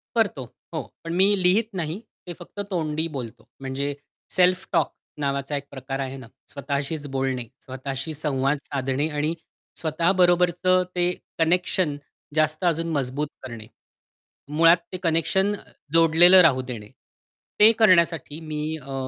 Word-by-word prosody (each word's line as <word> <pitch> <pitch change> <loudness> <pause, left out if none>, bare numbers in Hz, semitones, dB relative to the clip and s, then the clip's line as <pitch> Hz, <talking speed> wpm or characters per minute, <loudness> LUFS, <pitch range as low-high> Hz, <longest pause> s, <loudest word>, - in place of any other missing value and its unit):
करतो. 200 - +1 0.3
हो. 160 - -1 0.2
पण 165 - -4
मी 195 - +6 0.2
लिहीत 210 +5 +3
नाही. 165 +3 -3 0.3
ते 175 - -5
फक्त 175 +3 -11
तोंडी 160 -2 -1
बोलतो. 120 -3 -7
म्हणजे 135 +2 -2 0.4
सेल्फ 185 0 +3
टॉक - - +1 0.3
नावाचा 140 0 -1
एक 140 - -5
प्रकार 135 0 -5
आहे 135 0 -4
ना 130 -3 -11 0.2
स्वतःशीच 140 +2 -3
बोलणे. 130 -2 -1 0.2
स्वतःशी 135 +3 -5
संवाद 140 -1 0
साधणे 135 +1 -1
आणि 150 +2 -1 0.5
स्वतःबरोबरचं 175 +2 +3
ते 180 0 +2 0.3
कनेक्शन 175 -1 +1 0.4
जास्त 155 +1 +1
अजून 165 0 +1
मजबूत 140 0 -1 0.2
करणे. 115 -4 -8 0.8
मुळात 165 +3 +5 0.2
ते - - -2
कनेक्शन 180 +4 +1
अ, - - -12 0.3
जोडलेलं 165 +3 +7
राहू 140 -7 +4
देणे. 115 -5 -8 0.7
ते 215 +2 +9
करण्यासाठी 170 -7 +3
मी 150 -1 -3 0.2
अ, 140 -2 -9
155 Hz, 130 wpm, -24 LUFS, 135-175 Hz, 0.8 s, ते